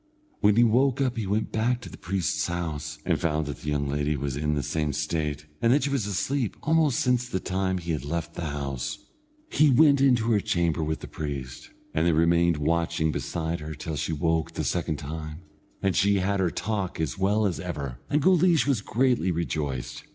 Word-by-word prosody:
When 105 -1 +4
he 120 - +6
woke 125 +4 +3
up 130 -2 +1
he 110 -4 -3
went 105 +3 -1
back 120 +3 +1
to - - -9
the - - -10
priest's 95 +2 -1
house, 75 -4 -4
and 85 -3 +1
found 80 -3 0
that 70 - -5
the 75 - -4
young 70 -1 0
lady 75 +1 0
was 70 -1 -3
in 75 +1 0
the 70 - -1
same 75 +2 -1
state, 75 0 -2 0.2
and 115 - +4
that 140 +2 +3
she 140 - 0
was 130 -7 0
asleep 120 +5 -1
almost 155 -4 +3
since 125 -1 +1
the 95 - -1
time 95 +1 -1
that 90 - -4
he 85 -1 -1
left 85 +2 -4
the 85 - -4
house. 70 -3 -3 0.5
He 155 - +5
went 140 +1 +5
into 120 -4 +3
her 105 - +4
chamber 85 -4 0
with 80 +1 -2
the - - -7
priest, 70 -4 -6 0.2
and 80 +2 +2
they 85 - +4
remained 85 +1 +3
watching 80 +1 +1
beside 80 +2 -3
her 75 +1 -6
till 75 +2 -5
she 75 - -2
awoke 80 -1 0
the - - -2
second 75 - -1
time, 75 +2 -6 0.4
and 95 -2 +2
she 100 +1 +3
had 100 +1 0
her 90 -2 +2
talk 100 -2 -3
as 80 +1 -2
well 105 +3 +2
as 95 -4 -1
ever, 70 -9 -5
and 150 0 +1
Guleesh 180 -2 +4
was 135 -7 +1
greatly 125 -2 +1
rejoiced. 75 -6 -3
85 Hz, 210 wpm, -26 LUFS, 75-110 Hz, 0.5 s, he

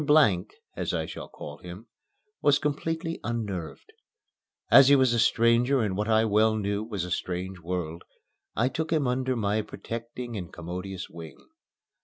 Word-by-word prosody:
Blank 145 - +4 0.2
(as - - -2
I - - -1
shall - - -7
call 75 0 -9
him) 90 +5 -10 0.6
was 145 0 +5
completely 160 +3 -2
unnerved. 105 -8 -4 0.8
As 135 - +9
he 140 - +7
was 130 -3 +4
a 120 - +2
stranger 115 +3 +3
in 105 -3 -1
what 105 +2 -1
I 110 0 +4
well 110 +1 +3
knew 100 0 -1
was 105 -5 -3
a 90 - -7
strange 90 +1 -3
world, 85 -1 -4 0.5
I 120 - +2
took 155 +5 -2
him 155 -4 +2
under 130 +1 0
my 105 -1 +1
protecting 115 +2 -6
and 90 -5 -6
commodious 90 +2 -6
wing. 80 -2 -10
110 Hz, 160 wpm, -27 LUFS, 90-125 Hz, 0.8 s, As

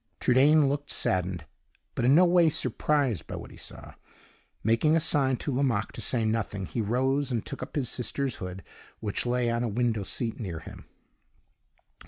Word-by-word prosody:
Trudaine 140 +4 +5
looked 145 +1 -2
saddened, 90 -3 0 0.5
but - - -1
in 135 +3 +6
no 180 +3 +7
way 175 -2 +5
surprised 135 - 0
by - - -5
what - - -8
he - - -13
saw. - - -9 0.7
Making 115 +9 +3
a - - +4
sign 135 -5 +2
to 145 - -3
Lomaque 125 -5 0
to - - -7
say 115 -3 0
nothing, 110 -3 -1
he 115 - -3
rose 130 +5 0
and 115 -3 -2
took - - -6
up 130 - -7
his 140 -4 0
sister's 130 +2 -2
hood, 90 0 -7 0.4
which 105 +3 -2
lay 120 -1 +1
on 115 0 -1
a - - 0
window 115 0 0
seat 115 +3 -2
near 95 -8 -4
him. 80 - -11
125 Hz, 180 wpm, -28 LUFS, 110-140 Hz, 0.7 s, no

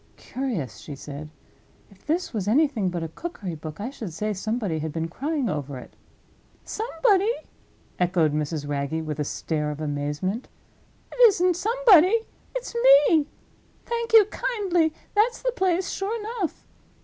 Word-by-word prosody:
"Curious!" 195 - -4
she 145 - -8
said. 145 +2 -8 0.6
"If 195 +5 -22
this 335 +1 -1
was 205 -3 -2
anything 245 -5 +2
but 175 -2 -3
a - - -2
cookery 195 - -6
book, 155 +1 -8
I 235 +6 -4
should 225 -9 -7
say 210 +6 -2
somebody 205 -4 -2
had 155 0 -3
been 165 +1 -2
crying 280 - -2
over 145 -5 -3
it." 125 - -12 0.7
"Somebody?" 420 -1 +2 0.7
echoed 175 -4 +2
Mrs. 150 0 -2
Wragge, 145 +3 -2
with 150 -1 -4
a - - +1
stare 150 +1 -2
of 150 0 -5
amazement. 150 - -2 0.6
"It - - -10
isn't 365 -4 +2
somebody—it's 450 +3 +3 0.4
Me. 310 -3 +3 0.6
Thank 470 -1 -3
you 440 -2 +9
kindly, 390 -8 0 0.2
that's 455 +4 +2
the - - +1
place, 375 -5 0
sure 415 +4 -2
enough. 425 -5 -4
230 Hz, 145 wpm, -25 LUFS, -, 0.7 s, you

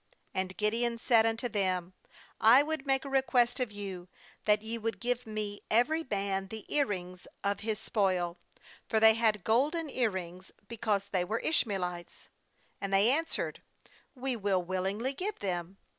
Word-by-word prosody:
^And 190 0 -3
Gideon 230 +3 0
'said 225 -1 +4
unto 225 +2 0
them: 185 -4 -1 0.5
'I 235 +6 +7
would 305 -2 -3
make 270 0 +2
a - - -4
request 260 -2 +2
of 250 -4 -1
you, 195 -3 -7 0.4
that 210 0 +3
ye 230 +1 -4
would 225 +1 -3
give 245 0 -2
me 210 -1 -4
every 305 +9 +3
man 195 -1 -1
the 220 +1 -8
ear 285 -2 +3
rings 180 -2 -6 0.2
of 200 0 +1
bas 215 -1 -2
spoil.' 185 -6 0 0.2
— - - -23
For 220 - +3
they 220 0 +8
had 220 -3 +2
golden 290 +7 +1
ear 245 -4 +2
rings, 185 -1 -7 0.2
because 215 -3 -1
they 185 -2 +1
were 215 +6 -2
Ishmaelites. 185 - -2 0.5
28And 195 - -3
they 200 +5 +5
answered: 325 +4 -1 0.3
' - - -30
We 260 -2 +1
will 195 -4 0
willing 185 +2 -2
ly 255 +4 -1
give 385 +9 -4
them.' 180 -1 -3
215 Hz, 175 wpm, -31 LUFS, 190-240 Hz, 0.5 s, they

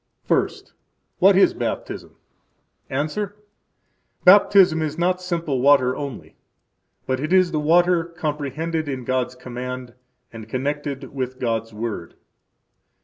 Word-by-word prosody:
First. - - -1 0.5
What - - +6
is - - +5
Baptism? - - -5 0.7
–Answer: 155 +9 -2 0.9
Baptism 185 -3 +6
is 155 0 -3
not 180 +1 +1
simple 170 -7 -2
water 130 -2 +4
only, 140 -4 -7 0.7
but 130 0 -1
it 155 +4 -3
is 185 -2 +4
the 155 - 0
water 170 +2 +3
comprehended 160 -1 -3
in 130 -2 -4
God's 130 0 -1
command 125 0 -7 0.4
and 110 -1 -10
connected 140 +1 -3
with 130 -2 -4
God's 115 -2 -2
Word. 105 -5 -5
145 Hz, 115 wpm, -22 LUFS, 125-170 Hz, 0.9 s, What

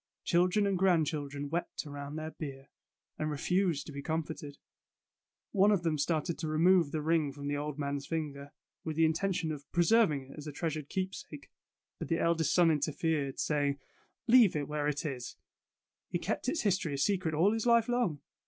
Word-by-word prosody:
Children 180 +4 +3
and 195 -2 0
grand 180 -4 +4
children 145 -1 -4
wept 165 +2 -3
around 145 0 -7
their 155 0 -4
bier, 135 -4 -8 0.5
and 155 - -1
refused 170 +1 0
to - - -8
be 140 0 -6
comforted. 155 -2 -4 0.9
One 200 0 +4
of 195 -4 +2
them 160 -3 0
started 160 +2 -1
to 160 - -3
remove 165 +1 +4
the 155 -1 -2
ring 160 -2 +2
from 140 +1 -7
the 145 0 -1
old 150 0 -4
man's 140 -1 -3
finger, 145 -3 -4 0.3
with 160 -1 -4
the 165 +1 +4
in 160 - +3
tention 175 -2 -1
of 145 -1 -8
preserving 170 - +3
it - - -12
as 150 - -8
a - - -4
treasured 155 -1 -3
keep 190 0 -2
sake, 150 -5 -10 0.5
but - - -4
the 165 - +1
eldest 165 -1 +1
son 175 -2 +5
interfered, 150 -1 -1
saying: 145 -2 +1 0.3
'' - - -43
Leave 225 -10 +7
it 145 -2 -1
where 150 -1 -1
it 150 +2 -2
is. 130 -5 -5 0.7
He 175 - 0
kept 210 - -2
its 315 - -1
history 185 -8 0
a - - -4
secret 175 0 +1
all 185 +7 +4
his 225 +1 -1
life 235 -1 +5
long. 240 - 0
155 Hz, 195 wpm, -31 LUFS, 145-175 Hz, 0.9 s, Leave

